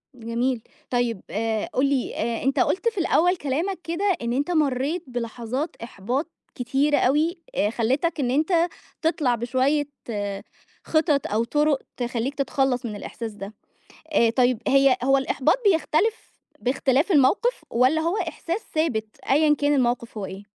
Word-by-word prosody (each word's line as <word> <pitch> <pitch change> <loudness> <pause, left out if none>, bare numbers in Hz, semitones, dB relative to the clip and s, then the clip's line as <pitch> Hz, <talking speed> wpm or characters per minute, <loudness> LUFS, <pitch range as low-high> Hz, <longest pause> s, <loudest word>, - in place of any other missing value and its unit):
جميل. 235 +1 -1 0.3
طيّب 240 -4 0
آآ 220 0 -1
قُل 260 +2 +2
لي، 275 -3 0
آآ 230 +1 -2
أنت 270 +1 +1
قُلت 430 +5 +1
في 425 - -17
الأوّل 355 +1 +3
كلامك 325 +7 -2
كده، 340 +5 -2 0.2
إن 235 +1 -1
أنت 285 +7 -1
مرّيت 300 +2 0
بلحظات 245 +5 -4
إحباط 245 - -3 0.3
كتيرة 275 +4 +1
أوي، 305 +8 +2 0.2
آآ 205 - +2
خلّيتك 265 +9 0
إن 250 -2 0
أنت 330 +4 +2 0.3
تِطلع 305 -7 +1
بشويّة 260 +5 +1 1.0
خِطط، 310 -3 +1
أو 220 +2 0
طُرُق 295 +2 +1 0.2
تخلّيك 245 +2 -2
تتخلّص 270 -2 0
من 210 -2 -4
الإحساس 225 +2 -6
ده. 205 +1 -8 0.6
آآ 230 -4 +4
طيّب 245 -1 +2
هي 275 -2 +5
هو 270 +1 +4
الإحباط 270 - +2 0.2
بيختلف 355 +7 0 0.3
بإختلاف 265 +6 +1
الموقف، 345 - +3
والّا 260 +7 +3
هو 340 +6 0
إحساس 355 +6 -3
ثابت، 245 -9 0 0.2
أيًا 300 +1 +4
كان 290 0 +1
الموقف 240 -3 0
هو 200 - -3
إيه؟ 195 +2 -8
270 Hz, 145 wpm, -24 LUFS, 240-310 Hz, 1.0 s, هي